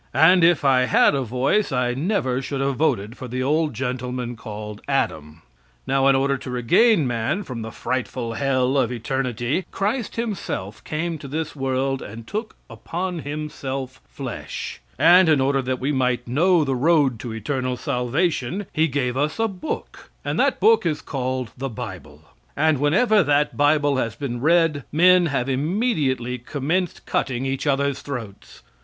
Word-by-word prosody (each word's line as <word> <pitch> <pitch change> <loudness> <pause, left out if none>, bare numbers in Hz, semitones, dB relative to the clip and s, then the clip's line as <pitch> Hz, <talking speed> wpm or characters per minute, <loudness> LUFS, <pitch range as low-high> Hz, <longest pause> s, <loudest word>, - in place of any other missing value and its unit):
And 180 +2 +6
if 165 -3 +4
I 130 -2 +4
had 125 - +4
a 140 - 0
voice 130 - 0
I 125 -1 +1
never 135 -4 0
should 135 +1 -4
have 135 -1 0
voted 115 -7 0
for 130 - -8
the 130 +1 -3
old 150 0 +1
gentleman 125 0 -3
called 105 -1 -8
Adam. 80 - -2 0.4
Now 135 0 +2
in 135 - +5
order 135 0 +1
to - - -8
regain 145 - +3
man 120 - -1
from 125 -8 -6
the 110 - -5
frightful 120 -1 -3
hell 135 +1 +1
of 125 -2 +1
eternity, 125 - -2
Christ 220 +5 -2
himself 195 - -4
came 160 +1 -3
to 140 - -8
this 155 +3 -4
world 135 0 -1
and 110 +2 -9
took 215 - -5
upon 180 0 -4
himself 140 -3 -5
flesh, - - -6 0.2
and 175 0 +6
in 155 -3 +4
order 135 +1 +2
that 130 0 -2
we 135 +3 -1
might 125 -3 0
know 165 +7 +3
the 135 -2 -1
road 140 -3 +3
to 120 - -6
eternal 125 +3 -2
salvation 140 +7 -1
he 160 +1 +3
gave 130 -3 -1
us 150 +3 -1
a 225 - +2
book, 195 +8 -6 0.2
and - - -1
that - - +2
book 450 +1 +5
is 150 -2 0
called 130 -3 -3
the 135 +1 -4
Bible, 110 - -8 0.3
and 155 -1 +3
whenever 205 - +4
that 145 -2 +1
Bible 145 -1 +3
has 115 -4 -1
been 120 -3 -4
read 165 -2 +3
men 180 +2 +5
have 135 -4 -1
immediately 135 - 0
commenced 155 +8 -2
cutting 130 0 -1
each 135 +2 -2
others' 140 -1 +1
throats. 115 -8 -8
135 Hz, 165 wpm, -23 LUFS, 125-160 Hz, 0.4 s, And